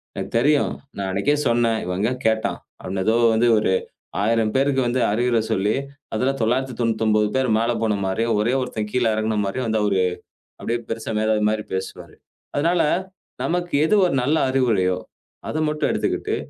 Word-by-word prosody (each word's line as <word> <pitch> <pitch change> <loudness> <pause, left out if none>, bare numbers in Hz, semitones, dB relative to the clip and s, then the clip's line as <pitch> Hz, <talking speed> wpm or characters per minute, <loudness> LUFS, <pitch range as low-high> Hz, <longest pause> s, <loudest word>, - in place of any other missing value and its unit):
எனக்கு - - -5
தெரியும். 145 +3 +2 0.2
நான் 100 - -2
அன்னைக்கே 100 +10 +1
சொன்னேன். 115 -1 +2
இவன் 90 +1 -3
எங்க 110 +4 +1 0.2
கேட்டான்." 110 0 0 0.2
அவன் 95 +1 -4
ஏதோ 110 - +3 0.2
வந்து 120 +2 +3
ஒரு 105 -3 +1 0.5
1000 115 0 +2
பேருக்கு 135 0 +2
வந்து 125 +1 0
அறிவுரை 120 +1 +2
சொல்லி, 100 +3 +1 0.4
அதுல 130 +5 +1
999 115 -3 +1
பேர் 130 -2 +1
மேல 115 +1 +1
போன 105 -2 +1
மாதிரியும், 115 +5 0
ஒரே 120 +4 +1
1த்தன் 110 -4 -4
கீழ 125 -1 +2
இறங்குன 110 0 -1
மாதிரியும் 115 +5 -2
வந்து 110 -1 +1
அவர் 100 -2 +1 0.6
அப்படியே 120 +1 -2
பெரிசா 115 0 -3
மேதாவி 110 0 +1
மாரி 110 -1 -2
பேசுவாரு. 95 0 -6 0.4
அதுனால, 170 +4 +2 0.6
நமக்கு 175 -1 -2
எது 215 - +2
ஒரு 175 - -1
நல்ல 150 +5 +2
அறிவுரையோ, 105 -9 +2 0.5
அத - - -4
மட்டும் 150 0 -1
எடுத்துக்கிட்டு, - - -1
115 Hz, 160 wpm, -22 LUFS, 105-130 Hz, 0.6 s, ஏதோ